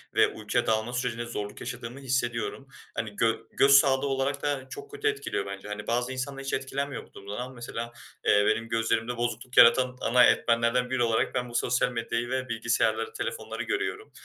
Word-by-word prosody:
ve - - +6
uykuya 115 +3 -2
dalma 110 +2 +1
sürecinde 125 -2 -2
zorluk 105 -3 -5
yaşadığımı 125 +1 -6
hissediyorum. 130 0 -2 0.3
Hani 110 -3 -4
gö 115 +1 +2 0.2
göz 140 0 +4
sağlığı 135 0 +5
olarak 135 +1 -1
da 140 -3 -2
çok 415 0 -9
kötü 430 0 -2
etkiliyor 425 -1 -1
bence. 100 +1 -7
Hani 105 0 -6
bazı 120 +2 0
insanlar 135 +1 -4
hiç 135 - -4
etkilenmiyor 135 +1 -3
bu - - -31
durumdan. 100 +1 -7
Ama 125 +1 -5
mesela, 120 -1 -6 0.3
eee, 105 - +5
benim 115 +1 +1
gözlerimde 115 +1 0
bozukluk 120 +1 -3
yaratan 125 +2 +6
ana 125 +2 +5
etmenlerden 115 +1 +3
biri 130 -1 +1
olarak 115 -1 +1
ben 125 -1 -1
bu 120 - -9
sosyal 125 +1 +2
medyayı 115 0 -2
ve 130 -1 -2
bilgisayarları, 115 -1 0
telefonları - - -4
görüyorum. 425 0 -3
120 Hz, 180 wpm, -28 LUFS, 115-130 Hz, 0.3 s, ve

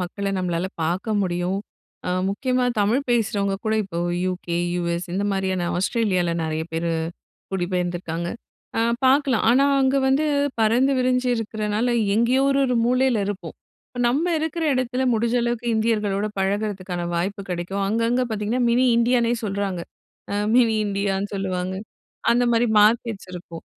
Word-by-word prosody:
மக்கள 195 +3 -3
நம்மளால 180 0 -1 0.2
பாக்க 180 +7 -1
முடியும். 180 0 -1 0.5
அ - - -1 0.2
முக்கியமா 250 +5 0 0.2
தமிழ் 220 +6 +2
பேசுறவங்க 200 -4 +1
கூட 220 0 +1
இப்போ 170 -3 -5 0.3
யுகே, 180 -2 -2 0.2
யுஎஸ் 170 0 -2
இந்த 200 +2 -1
மாதிரியான 190 -2 -1
ஆஸ்ட்ரேலியால, 185 -3 +1
நெறைய 160 0 -2
பேரு 165 +1 -1 0.6
குடிபெயர்ந்திருக்காங்க. 175 -2 -2 0.5
அ - - +3 0.3
பாக்கலாம், 265 -3 +3
ஆனா 265 +3 +4 0.2
அங்க 265 +1 +3
வந்து 275 +4 +2 0.4
பறந்து 245 +5 +3
விரிஞ்சி 255 0 +1
இருக்குறனால 215 +1 -1 0.2
எங்கேயோ 240 +4 +3
ஒரு, 275 - +2
ஒரு 250 - +1
மூலையில 250 -3 +2
இருப்போம். 185 -5 -5 0.3
இப்ப 245 - -6
நம்ம 280 +8 +1
இருக்குற 320 +1 -2
எடத்துல, 255 0 -1
முடிஞ்ச 235 +2 +1
அளவுக்கு 240 0 -2
இந்தியர்களோட 210 -2 0
பழகுறதுக்கான 190 -3 -2
வாய்ப்பு 195 +4 -2
கெடைக்கும். 180 +3 -2
அங்கங்க 230 +4 +1
பாத்தீங்கன்னா, 220 +4 -1
மினி 250 +2 +3
இந்தியானே 235 0 +3
சொல்றாங்க. 195 -3 -2 0.5
அ - - -1 0.2
மினி 230 -3 +4
இந்தியான்னு 200 0 -1
சொல்லுவாங்க. 185 -1 -2 0.6
அந்த 245 +1 +3
மாரி, 230 +1 +3 0.2
மார்க்கெட்ஸ் 220 -3 +1
இருக்கும். 170 -2 -9
205 Hz, 135 wpm, -23 LUFS, 185-240 Hz, 0.6 s, ஆனா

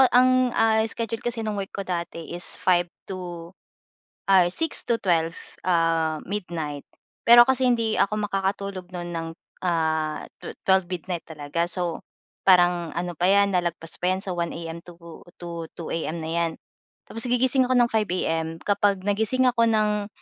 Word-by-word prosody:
ang, 255 +1 +4
ah, 220 0 +4
schedule 230 0 -4
kasi 235 -2 -3
no'ng 210 -2 -2
work 195 - -5
ko 200 - -6
dati 170 -2 -4
is 175 0 -1
5 175 -1 +2 0.2
to, 175 -2 -7 0.8
ay 180 -2 +6
6 325 - -2
to 235 - +3
12, 165 -3 +1 0.3
ah, 165 -3 +1
midnight. 165 -7 -4 0.4
Pero 240 0 +10
kasi 260 -1 +3
hindi 230 -3 +1
ako 210 +2 +2
makakatulog 195 -1 -2
no'n 175 -1 -5
ng, 165 -1 -3 0.4
ah, 160 -3 0 0.2
tu - - -7
12 190 -2 +3
midnight 180 -1 -4
talaga 155 +2 -2
so, 175 -2 -3 0.5
parang 175 -2 +4
ano 175 0 -2
pa 175 +3 +2
'yan 200 0 +4
nalagpas 170 -2 -3
pa 180 - +1
'yan 190 - -2
sa 190 - -3
1 170 -1 -1
AM 165 0 -6
to 175 -1 -13 0.4
2 170 -1 -7
AM 165 0 -3
na 160 - -4
'yan. 170 -1 0 0.6
Tapos 225 +3 -2
gigising 255 +2 +3
ako 255 - 0
ng 240 -1 +5
5 215 -2 +1
AM, 165 -2 -1
kapag 200 -1 +2
nagising 220 +6 +1
ako 235 -2 +3
ng 210 -2 +1
180 Hz, 165 wpm, -25 LUFS, 170-215 Hz, 0.8 s, Pero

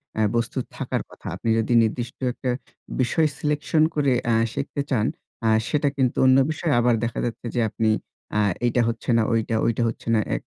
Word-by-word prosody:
অ্যা 110 - +1
বস্তু 115 -1 -1 0.2
থাকার - - -2
কথা। - - -12
আপনি 115 - -3
যদি 115 +2 0
নির্দিষ্ট 120 +3 -3
একটা 130 - -4 0.5
বিষয় 155 +5 +2
সিলেকশন 150 +1 +1
করে 140 -3 +2
অ্যা 115 -1 +2 0.2
শিখতে 140 0 -3
চান 115 -5 +1 0.4
আ - - +4 0.2
সেটা 145 -1 +1
কিন্তু 130 -3 +1
অন্য 130 0 +6
বিষয়ে 155 0 -1
আবার 120 -1 +3
দেখা 115 - -2
যাচ্ছে 120 0 -5
যে - - +1
আপনি 110 +1 -1 0.5
আ - - +3 0.3
এইটা 120 0 +2
হচ্ছে 115 +2 -5
না, - - +4
ঐটা, 115 0 0
ঐটা 115 +1 0
হচ্ছে 115 - -9
না - - +3 0.2
এক। - - -4
120 Hz, 190 wpm, -24 LUFS, 115-140 Hz, 0.5 s, অন্য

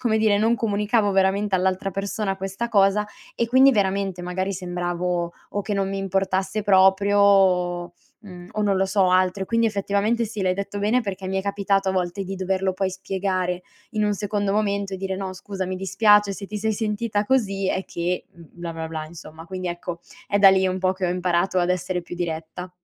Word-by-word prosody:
come 225 -3 +1
dire 215 -2 +3
non 225 +3 +3
comunicavo 210 -1 +1
veramente 195 +1 +2
all'altra 190 +1 0
persona 195 +1 -2
questa 195 +4 -4
cosa 205 0 +3 0.3
e 235 - 0
quindi 260 +3 +6
veramente 195 -3 0
magari 185 +2 -2
sembravo, 175 -1 -2 0.2
o 205 - -2
che 205 +1 -3
non 195 -1 0
mi 195 0 -3
importasse 195 +1 -1
proprio 195 +1 +4
o, 180 -3 +3 0.3
mhmm 180 -4 -11
o 215 - -1
non 200 -2 +2
lo 190 +1 +2
so, 190 -1 +2
altro, 185 +1 +2
e - - -4
quindi 230 +1 +2
effettivamente 205 +2 0
sì, 215 -1 -6
l'hai 185 0 +2
detto 200 +1 -4
bene 215 +5 +2
perché 195 -3 -5
mi 190 - -1
è 190 - -2
capitato 200 -1 0
a - - -2
volte 185 +1 -2
di 195 +1 -5
doverlo 190 0 -1
poi 190 0 -1
spiegare 185 -1 -2 0.3
in 215 -2 0
un 210 0 +1
secondo 205 0 -1
momento 200 -2 0
e - - -3
dire: 190 0 -3
"No 190 -1 -4
scusa, 190 +1 -5
mi 185 0 -3
dispiace 205 +1 +3
se 200 0 -7
ti 210 +1 -5
sei 220 +1 0
sentita 210 -1 -1
così, 195 -6 +1
è 190 - -1
che, 175 +1 -3
mhmm, 170 - -15
bla, 170 -1 -6
bla, 160 0 -5
bla" 155 -1 -5
insomma. 160 0 -11
Quindi 185 +1 -5
ecco, 175 0 -5 0.3
è 205 - +1
da 195 -1 +8
lì 190 0 +3
un 185 0 -1
po' 185 0 +1
che 190 -1 -2
ho - - 0
imparato 180 +1 +1
ad 180 0 +1
essere 180 0 -1
più 170 - -8
diretta. 170 +1 -5
195 Hz, 210 wpm, -23 LUFS, 185-205 Hz, 0.3 s, da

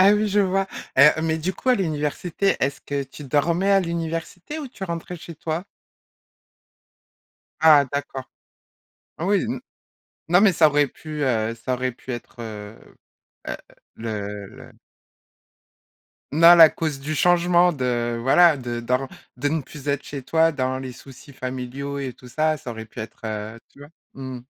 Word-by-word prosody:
Ah 195 +2 +7
oui, 210 0 +2
je 205 +1 +3
vois. 195 0 +1 0.3
Heu, 150 +3 +7
mais 160 0 0
du 175 +4 -2
coup, 260 - -6
à 255 - +6
l'université, 170 +1 -1
est-ce 135 0 -1
que 140 +1 -3
tu 135 +3 -12
dormais 170 +8 +1
à 195 - +5
l'université, 170 - -4
ou 300 - -5
tu 240 - -13
rentrais 170 0 -5
chez 170 0 -10
toi? 160 +3 -3 2.0
Ah 155 -3 +7
d'accord. 140 -2 -4 1.0
Oui 195 +2 +2
n 240 - -3 0.7
non, 180 +2 +5
mais 200 -2 +6
ça 160 -2 +5
aurait 145 0 +3
pu, 155 +1 -7
heu, 115 -3 0
ça 125 +3 -2
aurait 130 +1 -1
pu 130 +1 -8
être, 120 0 -8
heu 105 -1 -7 1.2
heu, 105 -2 -5
le - - -14 1.6
Non, 170 +3 +8
la 165 -1 +10
cause 155 -3 -3
du 150 +3 -3
changement 175 +2 +4
de 120 -4 -1
voilà, 155 +5 +5
de 120 -2 -4
dor 125 +3 -1 0.3
de 145 +3 0
ne 155 +1 -1
plus 145 +1 -10
être 140 -1 0
chez 140 -2 -6
toi, 165 +4 +3
dans 130 -2 -1
les 130 -1 -6
soucis 135 +2 -14
familiaux 130 +2 -5
et 135 -2 -4
tout 125 - -15
ça, 155 +4 0
ça 125 - -7
aurait 110 -1 -6
pu 110 +1 -10
être, 110 - -8
heu, 110 +1 -5
tu - - -22
vois? 145 0 -12 0.2
Mmh. 130 -2 -7
145 Hz, 165 wpm, -23 LUFS, 125-170 Hz, 2.0 s, la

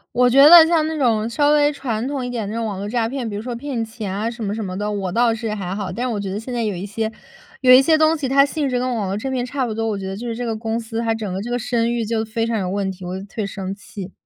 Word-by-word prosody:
我 250 0 +5
觉 275 +3 +7
得 330 0 +10
像 325 -2 +2
那 320 -1 -3
种 230 -4 +1
稍 290 +5 +2
微 295 0 +4
传 245 -5 -3
统 275 -2 -3
一 245 - -4
点 230 -4 -3
的， 205 - -5
那 230 - -2
种 230 - -2
网 205 -3 -3
络 200 +1 -4
诈 230 -1 0
骗， 245 -2 -4
比 - - -7
如 205 - -4
说 240 +1 -5
骗 250 -2 -3
钱 220 -4 -6
啊 215 +3 -1
什 235 -1 -7
么 200 0 -2
什 220 - -4
么 185 -1 -5
的， 210 +1 -2
我 195 -3 -2
倒 230 +4 +2
是 225 -1 -3
还 185 -2 -4
好。 200 -1 -4
但 245 +2 -3
是 250 - -1
我 205 - -2
觉 195 -1 -4
得 195 - -3
现 245 +3 -6
在 235 - -1
有 205 - -2
一 180 +3 -5
些 220 +2 -2 0.5
有 255 -1 +6
一 255 +1 +9
些 315 +3 +4
东 315 +1 +3
西， 280 - -2
它 275 +2 +5
性 285 0 -2
质 250 - 0
跟 250 0 -1
网 215 -4 -2
络 195 - -2
诈 265 +5 -4
骗 255 -2 -1
差 260 0 -2
不 225 - -3
多， 225 +1 -2
我 210 -2 -1
觉 195 - -6
得 195 +1 -4
就 240 - -6
是 230 - -3
这 245 - -4
个 225 - -1
公 225 0 -2
司 225 0 -4
它 225 -1 0
整 210 -4 -4
个 190 - -3
这 235 - -6
个 245 - 0
声 235 -2 0
誉 235 -1 -1
就 220 0 -1
非 225 +1 -2
常 230 -1 -1
有 185 -2 -2
问 195 0 -1
题， 185 -1 -10
我 180 +1 -4
就 190 - -7
特 200 - -16
别 215 - 0
生 195 -1 -5
气。 195 -1 -9
225 Hz, 375 characters per minute, -21 LUFS, 205-250 Hz, 0.5 s, 得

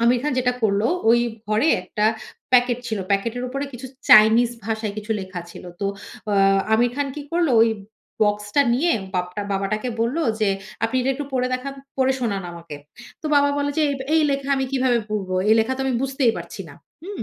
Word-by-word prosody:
আমির 240 +1 +4
খান 300 -1 -1
যেটা 250 0 +2
করল, 205 -1 +2 0.3
ওই 235 0 +5 0.3
ঘরে 215 +8 +2
একটা 210 +3 -2 0.5
প্যাকেট 245 -1 +4
ছিল। 220 -2 -2
প্যাকেটের 230 +5 0
উপরে 275 +2 -3
কিছু 245 +1 -8 0.2
চাইনিজ 220 +3 +7
ভাষায় 220 -2 -2
কিছু 215 +1 -3
লেখা 185 -2 -6
ছিল। 175 - -11 0.2
তো 200 - 0 0.5
আ - - +2 0.4
'আমির 240 +2 +3
খান' 280 -1 -1
কি 295 - -5
করল? 340 -2 +2
ঐ - - +8 0.6
বক্সটা 210 +6 +2
নিয়ে 335 +7 +2 0.2
বাপটা 180 +2 -2
বাবাটাকে 215 +5 -2
বলল, 235 +6 0 0.2
যে 215 - +3 0.4
"আপনি 225 +3 -1
এটা 260 +2 +1
একটু 290 +2 -4
পড়ে 255 -1 +1
দেখান, 265 +2 -4 0.3
পড়ে 265 0 +3
শোনান 200 -5 -1
আমাকে।" 170 -3 -9 0.5
তো 310 - -3
বাবা 285 0 +4
বলল 285 0 0
যে, - - +3
"এব 275 - -5 0.2
এই 320 - +4
লেখা 275 0 -2
আমি 265 - 0
কিভাবে 255 -3 +2
পড়ব। 205 -3 -3 0.2
এই 220 - +6
লেখা 225 +4 0
তো - - -5
আমি 260 - 0
বুঝতেই 265 -3 +1
পারছি - - -9
না।" - - -12 0.3
হুম? 395 +2 -6
240 Hz, 195 wpm, -22 LUFS, 210-270 Hz, 0.6 s, ঐ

